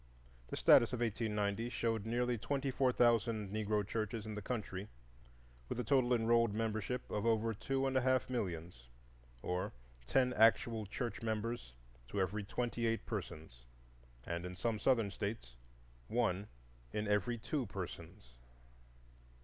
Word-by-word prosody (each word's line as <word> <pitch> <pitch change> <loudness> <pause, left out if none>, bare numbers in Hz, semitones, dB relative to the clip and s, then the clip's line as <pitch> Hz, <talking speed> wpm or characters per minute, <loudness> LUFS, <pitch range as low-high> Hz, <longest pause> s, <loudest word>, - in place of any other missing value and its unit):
The - - -5
census 120 +2 +6
of 120 - -2
1890 110 -1 0
showed 115 -3 -1
nearly 120 +1 +1
twenty 135 +6 -1
four 130 0 +3
thousand 115 -4 +2
Negro 105 -1 0
churches 110 0 -2
in 110 - -5
the 105 - -4
country, 100 -3 -4 0.8
with - - -3
a - - 0
total 125 0 +3
enrolled 115 -1 +3
membership 110 +2 -2
of 105 - -1
over 115 0 +2
two 135 +5 -1
and 135 0 0
a 130 - +4
half 130 0 +2
millions, 85 - -4 0.5
or 90 +1 -2 0.3
ten 125 - +3
actual 110 -1 +4
church 115 +1 -4
members 110 - -2 0.3
to 100 - -3
every 100 +3 0
twenty 120 +2 -1
eight 115 0 -1
persons, - - -6 0.6
and 85 +4 -3
in 90 0 -5
some 110 +3 -1
Southern 115 -3 +3
States 100 - -4 0.5
one 105 -4 0 0.4
in 105 0 -2
every 105 +3 +1
two 130 +2 -2
persons. 90 -5 -7
110 Hz, 140 wpm, -36 LUFS, 100-120 Hz, 0.8 s, census